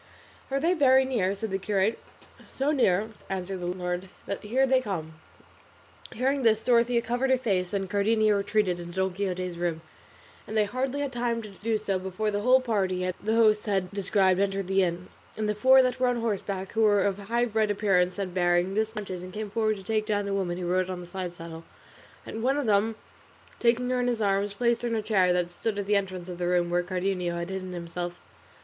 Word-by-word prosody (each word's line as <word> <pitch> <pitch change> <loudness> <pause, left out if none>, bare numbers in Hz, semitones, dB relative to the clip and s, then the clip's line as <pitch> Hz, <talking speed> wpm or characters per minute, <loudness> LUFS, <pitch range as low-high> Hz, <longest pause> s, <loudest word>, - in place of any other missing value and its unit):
"Are 275 0 0
they 335 +5 +2
very 265 -5 +5
near?" 205 -7 0
said 215 +1 -5
the 195 - -1
curate. 200 +2 0 0.6
"So 275 +3 +1
near," 215 -7 +2 0.2
answered 190 0 -3
the 175 - -4
landlord, 180 +1 -3 0.2
"that 200 - -4
here 245 +6 +2
they 260 -1 +3
come." 170 -9 -4 1.0
Hearing 270 +4 0
this 220 -2 +3
Dorothea 235 -1 +3
covered 245 +3 0
her 260 - +4
face, 190 -8 -1
and 195 -1 -2
Cardenio 215 +2 +2
retreated 200 -3 0
into 175 0 -8
Don 190 -1 0
Quixote's 180 -2 -3
room, 170 -2 -2 0.7
and 220 - -3
they 215 - +5
hardly 260 +6 -2
had 280 -2 -3
time 235 -1 -1
to 215 - -8
do 215 +3 -2
so 200 -3 -1
before 190 +3 -2
the 205 - -1
whole 255 +5 +5
party 185 -6 0
the 220 +2 0
host 215 -2 +4
had 190 -3 0
described 195 -2 +2
entered 195 -1 0
the 195 +1 +2
inn, 180 0 -1 0.3
and 215 -1 -1
the 210 - +1
four 260 +5 +6
that 255 0 -1
were 255 - +3
on 245 -1 +1
horseback, 200 -4 -3
who 225 - 0
were 205 -2 +4
of 200 -1 0
highbred 220 0 0
appearance 190 -3 +2
and 190 -3 -3
bearing, 175 +1 +2
dismounted, 210 -4 -3
and 185 0 -8
came 210 -1 -5
forward 215 0 +1
to 195 - -10
take 215 0 -1
down 205 -1 0
the 200 - -2
woman 180 -3 -1
who 180 - -4
rode 185 +1 +1
on 185 -1 -4
the 175 - -8
side 180 0 -5
saddle, 165 -1 -9 0.6
and 225 - -6
one 265 +4 +2
of 290 - -1
them 215 +1 +2 0.6
taking 245 +1 +2
her 250 - +1
in 245 - 0
his 240 -2 0
arms 200 -1 0
placed 235 +1 +1
her 240 - -1
in 230 - -1
a 220 - 0
chair 195 -4 +3
that 180 -1 0
stood 205 +4 -3
at 205 - -2
the 205 +1 +2
entrance 185 -3 -2
of 180 -1 -7
the 175 - -1
room 175 -1 +1
where 175 0 +2
Cardenio 180 -1 -2
had 170 +2 -4
hidden 185 -1 -5
himself. 175 0 -5
200 Hz, 220 wpm, -27 LUFS, 185-230 Hz, 1.0 s, four